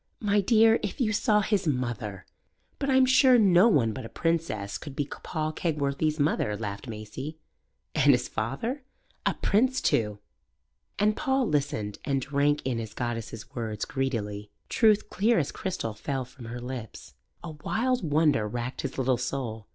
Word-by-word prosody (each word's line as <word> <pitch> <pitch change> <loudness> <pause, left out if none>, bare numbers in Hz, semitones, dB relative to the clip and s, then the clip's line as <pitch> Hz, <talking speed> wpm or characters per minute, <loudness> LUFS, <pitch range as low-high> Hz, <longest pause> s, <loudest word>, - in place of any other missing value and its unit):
"My 205 -1 +2
dear, 225 +2 +5
if 205 - -4
you 220 -4 +1
saw 210 0 +3
his 200 -3 0
mother!" 120 -8 -2 0.5
"But 275 - -1
I'm 265 -1 +5
sure 260 0 +6
no 195 -2 +6
one 125 - +3
but 130 - -6
a 115 - -8
princess 165 -12 -1
could 145 -3 -9
be 145 - -1
Paul 155 +2 -4
Kegworthy's 155 -1 -1
mother," 125 -8 +1
laughed 100 +1 -5
Maisie. 115 +8 -7 0.6
"And - - +5
his - - +2
father?" 180 - -3 0.5
"A - - +1
prince 255 +6 +2
too!" 105 -2 +1 0.8
And 210 +1 +2
Paul 265 -2 +1
listened 135 -9 -1
and 140 -2 0
drank 145 +2 +1
in 125 -3 -1
his 110 -2 -7
goddess's 115 -2 -5
words 110 -3 -3
greedily. 105 -7 -3 0.2
Truth 215 -2 +3
clear 225 +4 +2
as 150 -3 0
crystal 185 - -3
fell 130 +4 -3
from 125 0 -13
her 120 +2 -6
lips. 120 -3 -7 0.3
A 170 - -5
wild 235 +10 -1
wonder 150 -7 +2
racked 120 +3 -4
his 135 - -5
little 130 -1 +2
soul. 120 -5 -4
140 Hz, 160 wpm, -27 LUFS, -, 0.8 s, sure